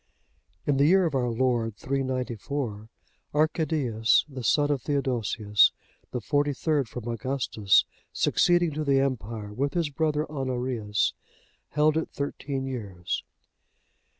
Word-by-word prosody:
In 145 -2 +2
the 140 +2 +5
year 190 +2 +5
of 160 - -1
our 125 -2 +1
Lord 115 -2 0
394,(63) 130 -4 -3 0.5
Arcadius, 150 -7 +2
the 135 -4 -7
son 145 +4 +3
of 140 -3 0
Theodosius, 115 -7 +2 0.4
the 125 - -3
forty 145 +4 +1
third 145 -3 0
from 120 0 -7
Augustus, 115 -4 +2 0.3
succeeding 175 -2 +3
to 155 +1 -3
the 140 -2 +3
empire, 115 -6 -2
with 140 +5 -1
his 165 -4 0
brother 155 0 0
Honorius, 125 -7 -1 0.5
held 150 +1 +2
it 160 - -1
thirteen 140 -1 -4
years. 100 -9 -4
135 Hz, 125 wpm, -27 LUFS, 115-145 Hz, 0.5 s, the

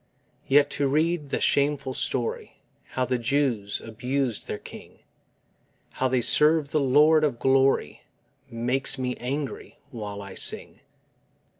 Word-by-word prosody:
Yet 145 +1 +4
to 140 - 0
read 155 +1 0
the - - -1
shameful 140 -2 +1
story 125 -2 -3 0.3
How 130 - -2
the 125 -1 -1
Jews 120 -5 -1
abused 125 +2 -3
their - - -4
King, - - -13 0.9
How 130 - -1
they 130 -1 +1
served 150 +3 +4
the 155 - +1
Lord 150 +3 +4
of 140 -6 0
Glory, 135 +2 +1 0.5
Makes 125 +3 0
me 125 -1 -2
angry 135 +3 -5
while 105 -5 -6
I 100 -1 -10
sing. - - -2
135 Hz, 130 wpm, -25 LUFS, 125-145 Hz, 0.9 s, Yet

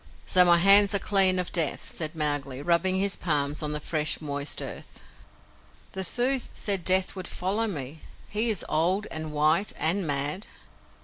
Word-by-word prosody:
"So 180 - +5
my 175 -1 +5
hands 200 +3 +6
are - - +5
clean 195 -2 +3
of 180 -1 -1
Death," 165 -5 0
said 155 0 -3
Mowgli, 145 -3 -2
rubbing 175 +3 +1
his 195 +1 0
palms 145 -3 -1
on 150 -1 -4
the 150 - -4
fresh, 150 0 -2
moist 145 -1 -4
earth. - - -9 0.9
"The 190 - -6
Thuu 250 +8 0 0.2
said 195 -4 -3
Death 185 +2 +1
would 185 -1 -6
follow 205 +5 -2
me. 150 -5 -7 0.3
He 220 +3 0
is 210 -5 -1
old 180 +6 0
and 155 -1 -5
white 155 +6 +1
and 175 +2 +1
mad." 145 +7 -3
175 Hz, 170 wpm, -25 LUFS, 150-195 Hz, 0.9 s, hands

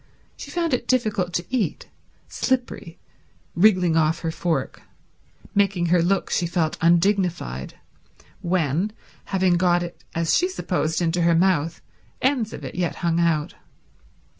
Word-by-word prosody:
She - - -9
found 335 -4 -1
it 250 - -1
difficult 215 -8 0
to 175 - -1
eat—slippery, 245 -3 -4 0.6
wriggling 180 -3 +4
off 160 0 +2
her 165 - -2
fork, 160 -5 -2 0.7
making 195 -3 +2
her 175 - +4
look, 190 +3 0
she 175 - +1
felt, 165 -2 0
undignified 170 - +1 0.7
when, 175 +3 0 0.3
having 185 -2 +2
got 175 0 +2
it 175 0 -9
as 165 -1 +2
she 360 - +2
supposed 175 - -1
into 170 +1 0
her 170 0 +3
mouth, 165 -2 +1 0.4
ends 250 -5 +1
of - - -8
it - - -6
yet 175 -2 -2
hung 170 0 +2
out. 165 -3 +1
175 Hz, 135 wpm, -23 LUFS, 165-195 Hz, 0.7 s, wriggling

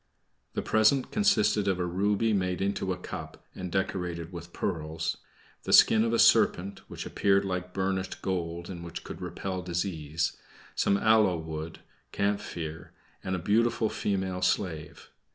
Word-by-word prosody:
The - - -1
present 110 +5 +3
consisted 110 - +3
of 95 -2 +1
a 90 - 0
ruby 100 +5 +1
made 90 -2 0
into 95 -1 -1
a 90 - -2
cup, 90 - -8
and 90 -1 -6
decorated 90 -2 -2
with 85 0 -8
pearls; 80 -2 -2 0.4
the - - -2
skin 110 0 +7
of 115 - +1
a 115 - +2
serpent, 110 -4 +4
which - - -6
appeared 100 -1 +2
like 90 -1 -3
burnished 95 0 -2
gold, 85 -2 -2
and 85 -3 -7
which 85 0 -7
could - - -8
repel 90 +1 -4
disease; 85 -3 -2 0.4
some 100 - +2
aloe 110 -4 +4
wood, 80 0 -6 0.3
camphire, 90 -5 -3 0.3
and 95 - -1
a - - -1
beautiful 110 +5 +2
female 95 -2 -2
slave. 85 -4 -2
95 Hz, 150 wpm, -29 LUFS, 85-100 Hz, 0.4 s, skin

